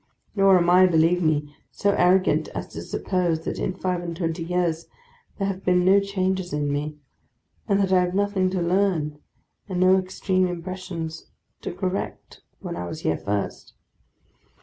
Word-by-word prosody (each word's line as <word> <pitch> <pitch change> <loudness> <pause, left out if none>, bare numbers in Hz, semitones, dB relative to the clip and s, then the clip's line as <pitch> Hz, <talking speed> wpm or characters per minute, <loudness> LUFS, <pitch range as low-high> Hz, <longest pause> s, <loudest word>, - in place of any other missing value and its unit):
Nor 195 -2 +6
am 170 -1 +2
I, 180 +1 +6
believe 170 +1 +3
me, 150 -2 0
so 200 - 0
arrogant 185 0 +3
as - - -4
to - - -7
suppose 175 -4 -1
that - - -4
in 185 - -2
five 185 -2 -2
and 170 -1 -5
twenty 165 -1 -2
years 170 -1 -1 0.5
there 195 - -1
have 195 -1 -4
been 180 -1 +3
no 195 +2 +6
changes 190 -2 -1
in 145 -1 -1
me, 150 +1 -3 0.7
and 200 -2 +2
that 190 -1 +2
I 185 - +6
had 180 0 -1
nothing 200 -2 +1
to 185 -2 -1
learn 170 -5 0 0.5
and 180 -2 -2
no 185 +1 +5
extreme 185 0 0
impressions 175 -2 -6 0.3
to - - -4
correct 185 +2 -4 0.2
when - - -5
I 90 0 -4
was - - -6
here 80 - 0
first. 100 0 -3
180 Hz, 170 wpm, -24 LUFS, 165-190 Hz, 0.7 s, Nor